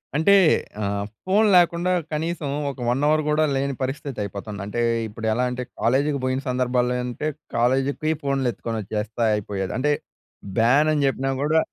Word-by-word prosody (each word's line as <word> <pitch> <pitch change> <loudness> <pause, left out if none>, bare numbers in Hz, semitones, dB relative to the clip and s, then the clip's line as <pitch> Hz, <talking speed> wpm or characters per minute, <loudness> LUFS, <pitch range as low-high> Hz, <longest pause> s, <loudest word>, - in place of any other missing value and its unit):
అంటే 160 +7 +4 0.5
ఆహ్, 100 0 -1 0.2
ఫోన్ 205 +4 +4
లేకుండా 175 0 +3 0.2
కనీసం 160 -1 -2 0.2
ఒక 135 - -13
1 125 +3 +1
అవర్ 155 +1 +3
కూడా 155 +1 +3
లేని 135 0 -1
పరిస్థితి 135 0 -4
అయిపోతుంది. 100 +1 -6
అంటే 105 +4 -2 0.3
ఇప్పుడెలా 110 +2 -1
అంటే 125 0 -3 0.2
కాలేజ్‌కి 140 +4 +2
బోయిన 130 +1 0
సందర్భాల్లో 125 -1 +1
అంటే 125 +5 -3 0.3
కాలేజ్‌కి 130 +4 +2
పొయ్ 155 +1 +2
ఫోన్‌లు 135 -2 0
ఎత్తుకొనొచ్చే‌స్తే 110 +1 -3
అయిపోయేది. 100 -2 -3
అంటే 150 +3 +2 0.7
బ్యాన్ 135 +7 +4
అని 145 -2 +1
చెప్పినా 135 0 -1
కూడా 155 +2 +3
130 Hz, 150 wpm, -23 LUFS, 115-150 Hz, 0.7 s, అంటే